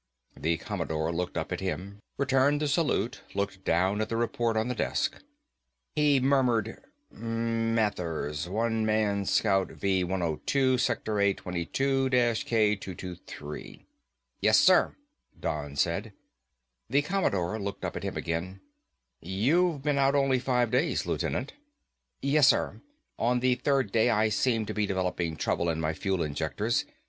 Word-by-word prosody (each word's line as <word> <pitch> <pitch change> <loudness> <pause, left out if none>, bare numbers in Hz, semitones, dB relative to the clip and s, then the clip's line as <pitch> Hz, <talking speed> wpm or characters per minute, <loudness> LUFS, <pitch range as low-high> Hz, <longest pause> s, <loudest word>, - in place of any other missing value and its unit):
The 80 +1 0
Commodore 80 -4 -2
looked 90 +1 -3
up - - -3
at - - -2
him, 95 +2 -4 0.2
returned 140 +1 +3
the 150 - 0
salute, 140 -4 0
looked 100 -1 -2
down 95 +5 +1
at 110 - -2
the 115 - -1
report 115 0 0
on 110 +2 +1
the 125 - -1
desk. - - -1 0.7
He 145 -2 +4
murmured, 125 -5 +1 0.3
"Mathers, 115 -9 -1
One 110 +2 0
Man 105 -2 +1
Scout 95 -2 +2
V 95 -2 0
102. 95 - 0
Sector 110 -4 0
A22 100 +8 0
K223." 105 - -1 0.5
"Yes, - - +5
sir," - - +5 0.4
Don 75 -2 -3
said. 85 +8 -1 0.8
The 140 +3 +3
Commodore 110 - 0
looked 100 -1 -4
up - - -4
at - - -4
him - - -4
again. 85 +3 -3 0.6
"You've 140 - +1
been 145 -1 +1
out 135 +1 +3
only 135 -2 +3
five 125 -2 +1
days, 130 +7 +1
Lieutenant." - - -2 0.7
"Yes, 140 0 +4
sir, - - +2 0.4
on 125 +2 +2
the 125 +1 +3
third 135 -4 0
day 115 +2 +3
I 110 -1 +3
seemed 115 +1 +1
to - - -4
be 105 -1 0
developing 90 -4 -1
trouble 85 +2 0
in 80 -1 -1
my 80 0 0
fuel 95 +1 -1
injectors. 100 +10 -1
110 Hz, 135 wpm, -28 LUFS, 90-125 Hz, 0.8 s, Yes